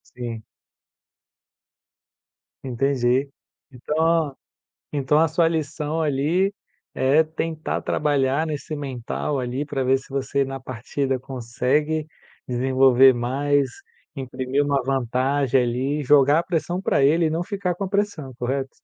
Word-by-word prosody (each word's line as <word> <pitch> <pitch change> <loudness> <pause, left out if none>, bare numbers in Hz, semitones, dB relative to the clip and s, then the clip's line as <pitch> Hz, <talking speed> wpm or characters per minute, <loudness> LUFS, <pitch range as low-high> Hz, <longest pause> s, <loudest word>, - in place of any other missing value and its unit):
Sim. 120 -3 -5 2.2
Entendi, 130 +1 +1 0.4
então 155 +3 0 0.6
então 145 +1 +2
a 165 - +4
sua 165 +2 +2
lição 155 0 -2
ali, 160 +7 +1 0.4
é 140 +4 +4
tentar 160 0 -3
trabalhar 145 +1 +1
nesse 155 0 -4
mental 140 0 -3
ali, 130 +3 -2
pra 135 -2 -2
ver 130 +1 +3
se 135 - -14
você 135 0 0
na 135 0 -6
partida 130 +2 -3
consegue 135 +5 -1 0.4
desenvolver 130 +1 +5
mais, 135 +3 0 0.5
imprimir 130 +1 -1
uma 140 -1 +1
vantagem 135 +1 +1
ali, 130 +5 -1
e - - -3
jogar 145 +2 +5
a - - -1
pressão 175 +1 -2
pra 140 - +2
ele 160 +4 +4
e - - +2
não 165 +2 -1
ficar 190 -2 -2
com 195 - -4
a - - -2
pressão, 200 -9 -2
correto? 135 +2 -2
140 Hz, 125 wpm, -23 LUFS, 130-155 Hz, 2.2 s, desenvolver